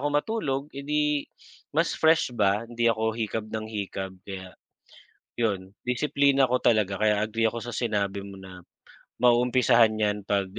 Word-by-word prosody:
ako 145 - -1
matulog, 145 -4 -1
eh, - - -4
'di 150 0 0 0.5
mas 165 +2 +2
fresh 160 -5 +3
ba, 105 0 +2
hindi 120 0 -1
ako 110 0 0
hikab 110 -1 -2
ng 110 0 -4
hikab 95 -3 -4
kaya, 95 -2 -8 0.8
yun 100 -5 -1
disiplina 140 +1 +2
ko 125 +1 +2
talaga. 105 -5 +2
Kaya 105 -1 +3
agree 115 +1 +1
ako 115 +1 -5
sa 120 - -6
sinabi 100 -4 -1
mo 100 0 -10
na 95 -1 -11 0.6
mauumpisahan 120 -2 +4
‘yan 105 -1 0
‘pag 100 -1 +1
110 Hz, 155 wpm, -26 LUFS, 100-125 Hz, 0.8 s, mauumpisahan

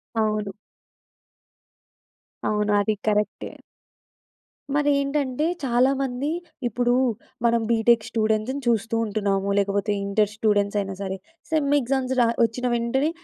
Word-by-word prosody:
అవును. 215 -2 0 1.9
అవును. 210 0 +1
అది 215 +1 +1
కరక్టె. 210 0 0 1.2
మరేంటంటే, 285 -1 +1 0.2
చాలామంది 265 +2 +1 0.4
ఇప్పుడు 245 +2 +1 0.5
మనం 235 0 +3
బీటెక్ 230 0 +3
స్టూడెంట్స్‌ని 220 +4 0
చూస్తూ 225 0 +1
ఉంటున్నాము. 200 -2 -1
లేకపోతే 200 +1 0
ఇంటర్ 205 +1 +1
స్టూడెంట్స్ 205 -2 +1
అయినా 195 -1 -3
సరే, 190 -1 -3 0.3
సెమ్ 305 -3 +1
ఎగ్జామ్స్ 260 +1 -1
రా - - +5 0.2
వచ్చిన 245 +2 0
వెంటనే 250 +6 +1
225 Hz, 100 wpm, -24 LUFS, 210-260 Hz, 1.9 s, రా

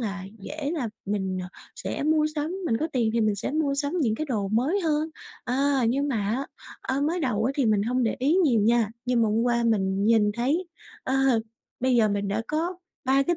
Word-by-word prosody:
là 200 -4 -3
dễ 295 +7 -4
là 285 -9 -2 0.2
mình, 190 -2 -1
ờ, 180 - -7 0.3
sẽ - - -4
mua 305 0 +3
sắm, 310 +5 -2
mình 225 - +2
có 315 - -1
tiền 235 -4 +1
thì 230 - +1
mình 215 -1 +2
sẽ 200 - -3
mua 300 -3 +1
sắm 285 +2 -1
những 225 -7 +2
cái 310 - -3
đồ 210 -7 -1
mới 265 - +1
hơn. 315 -1 0 0.3
Ờ, 250 - -1 0.3
nhưng 280 +4 +1
mà 260 - 0
á, 250 +6 -1 0.3
ơ, 265 +1 -1
mới 335 +4 0
đầu 220 -6 0
á 265 - +1
thì 270 -5 +2
mình 210 -2 +3
hông 250 +3 0
để 225 - 0
ý 280 +6 +2
nhiều 285 - +4
nha, 225 0 +3
nhưng 245 -2 +2
mà 220 - +3
hôm 220 +2 +1
qua 240 -1 +2
mình 195 -3 +1
nhìn 215 -1 +4
thấy, 290 +10 0 0.4
ờ, 260 - 0 0.7
bây 255 0 +2
giờ 220 -2 +4
mình 200 -1 -1
đã 215 +3 -1
có 335 +4 -1 0.3
3 270 +1 +4
cái 345 +4 0
245 Hz, 230 wpm, -26 LUFS, 215-295 Hz, 0.7 s, nhiều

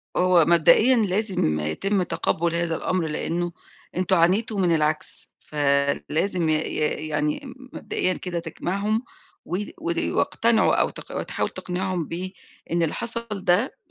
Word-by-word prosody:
هو 180 -3 +4
مبدئيًا 170 +10 +5
لازم 195 - +1
يتم 180 - 0
تقبُّل 170 0 -1
هذا 170 -1 0
الأمر 175 0 -1
لإنه 170 +3 -2 0.4
أنتم 185 +1 +2
عانيتوا 200 +5 +2
من 175 -3 +3
العكْس 155 0 +2
فلازم 150 +4 0
ي - - +3
ي 155 0 -1
يعني 150 -1 -1
م 260 0 -12
مبدئيًا 185 - -1
كده 180 -2 -4
تجمَعهم 200 +6 -2 0.4
و 180 - -2 0.2
ود 170 0 -1
واقتنعوا 230 -1 +2
أو - - +2
تق - - -6
تحاول - - -2
تقنِعهم 180 -1 -3
بإن 180 +3 -4 0.5
اللي 160 - 0
حصَل 235 0 -2
ده 200 +3 +1
175 Hz, 135 wpm, -24 LUFS, 160-200 Hz, 0.5 s, مبدئيًا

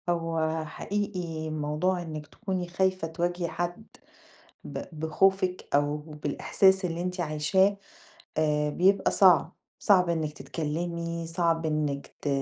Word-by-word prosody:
هو 165 -2 0
حقيقي 175 -2 -3
موضوع 155 +4 0
إنِك 155 -3 -6
تكوني 185 +1 -4
خايفة 185 -1 0
تواجهي 175 +1 -2
حد 175 +5 -4 0.8
ب - - -5 0.2
بخوفِك 185 +3 +2
أو 145 +1 +2
بالإحساس 155 +6 +1
اللي 170 -1 -2
أنتِ 180 +1 -3
عايشاه 175 +5 +2 0.6
آآ، 150 -1 +2
بيبقى 190 +5 +3
صعب، 180 -3 +5 0.2
صعب 185 -3 +4
إنِك 160 -3 -1
تتكلّمي، 170 +4 -3
صعب 165 -1 0
إنِك 150 -2 -1 0.2
ت - - -1
170 Hz, 115 wpm, -28 LUFS, 155-180 Hz, 0.8 s, صعب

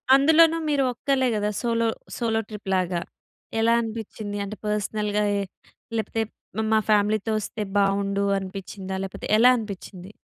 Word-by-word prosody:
అందులోనూ 320 +4 +6
మీరు 285 -2 +2
ఒక్కళ్ళే 260 +1 +1
గదా! 210 0 0
సోలో, 230 -1 +1 0.3
సోలో 225 -2 +1
ట్రిప్ 210 -2 -7
లాగా, 180 -2 0 0.6
ఎలా 230 +1 +4
అనిపిచ్చింది? 220 -2 -5
అంటే 205 +2 -6
పర్స్‌నల్‌గా 210 0 0
ఏ - - 0 0.6
లేపోతే 225 +1 -1 0.4
మ, - - 0
మా 220 - +5
ఫ్యామిలీ‌తో 210 +1 +2
వస్తే 215 +1 -5 0.2
బావుండు 200 0 +2 0.2
అనిపిచ్చిందా? 190 0 -6
లేపోతే 190 - -6
ఎలా 245 +3 +7
అనిపిచ్చింది? 200 -3 -7
210 Hz, 135 wpm, -25 LUFS, 200-230 Hz, 0.6 s, ఎలా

